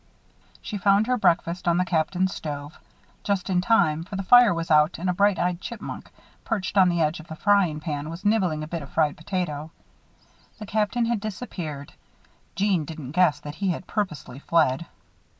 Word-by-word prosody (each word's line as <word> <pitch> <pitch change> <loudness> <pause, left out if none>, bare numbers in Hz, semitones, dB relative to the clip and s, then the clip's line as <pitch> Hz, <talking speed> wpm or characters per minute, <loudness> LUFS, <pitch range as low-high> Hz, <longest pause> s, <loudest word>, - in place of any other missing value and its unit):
She 210 -3 -5
found 200 +2 +4
her 250 +2 +1
breakfast 175 -4 +1
on 170 0 +3
the 180 - +2
Captain's 180 +2 0
stove. 145 +1 -6 0.4
Just 200 -1 -1
in 180 -1 +2
time, 175 -8 +2
for 185 +3 -8
the 195 - -3
fire 245 +2 +7
was 165 -1 -3
out 150 +2 +4
and 175 +3 -3
a 180 - +2
bright 200 +1 +3
eyed 175 +1 -1
chipmunk, 235 +1 -7 0.3
perched 210 -4 -3
on 190 -2 +6
the 170 -1 0
edge 155 +3 -1
of 160 - -12
the 160 - -7
frying 190 -5 +2
pan, 150 -1 -4
was 170 +5 -8
nibbling 185 -8 +1
a - - -6
bit 165 0 -4
of 140 - -10
fried 150 -2 +1
potato. 155 -3 -4 0.9
The 215 - -8
Captain 215 +3 0
had 230 -1 0
disappeared. 180 - -6 0.6
Jeanne 195 -4 +1
didn't 150 -4 -8
guess 165 -3 +3
that 145 - -7
he 195 - +1
had 180 +1 -3
purposely 155 - -4
fled. 160 -1 +1
180 Hz, 185 wpm, -25 LUFS, 155-200 Hz, 0.9 s, fire